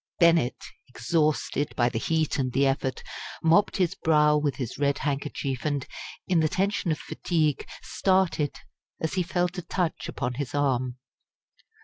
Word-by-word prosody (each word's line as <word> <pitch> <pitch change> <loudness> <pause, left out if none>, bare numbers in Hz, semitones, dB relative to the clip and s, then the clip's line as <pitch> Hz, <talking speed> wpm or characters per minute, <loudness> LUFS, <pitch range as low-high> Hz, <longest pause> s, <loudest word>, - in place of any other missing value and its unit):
Bennett, 165 -8 +4 0.2
exhausted 150 +3 0
by 120 - +3
the 120 -2 -1
heat 160 +2 0
and 130 -2 -1
the 140 +1 +3
effort, 135 -1 -1 0.4
mopped 165 +6 +4
his 180 -2 +2
brow 150 -5 +3
with 150 -2 +1
his 125 -1 -5
red 140 -1 +2
handkerchief, 140 -2 -2
and, 145 -3 -1 0.4
in 180 -3 +3
the 155 -1 +2
tension 195 -1 0
of 155 - 0
fatigue, 155 -4 -1 0.2
started 185 -6 +1 0.4
as 160 - -2
he 185 - +1
felt 180 +1 -1
a - - -3
touch 175 -1 -2
upon 125 +1 -2
his 140 +1 -4
arm. 130 -3 0
150 Hz, 150 wpm, -27 LUFS, 135-170 Hz, 0.4 s, Bennett